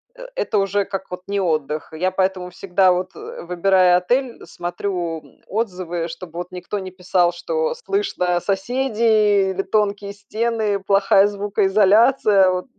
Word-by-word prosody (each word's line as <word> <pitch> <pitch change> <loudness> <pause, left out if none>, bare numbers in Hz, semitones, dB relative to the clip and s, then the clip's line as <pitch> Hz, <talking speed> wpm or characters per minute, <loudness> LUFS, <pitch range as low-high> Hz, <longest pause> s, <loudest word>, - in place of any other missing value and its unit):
Э, - - -11
это 220 - -1
уже 195 0 0
как 195 -1 -6
от 180 0 -8
не 200 0 -1
отдых. 155 -3 -2
Я 185 +4 -1
поэтому 185 -1 -1
всегда, 185 +1 +2
вот, 180 +1 -2
э, - - -9
выбирая 180 +1 +3
отель, 245 +7 -1
смотрю, 175 -1 -4
м, - - -22
отзывы, 180 -6 -3
чтобы 170 0 -9
вот 175 0 -6
никто 180 +3 -5
не 185 -1 -7
писал, 180 -1 +1
что 475 - -2
слышно 390 - -1
соседей 210 -1 +1
или 190 - -2
тонкие 205 -1 -1
стены, 215 0 -2
плохая 195 0 +4
звукоизоляция, 205 +1 +3
вот. 180 0 -3
195 Hz, 145 wpm, -21 LUFS, 180-210 Hz, -, плохая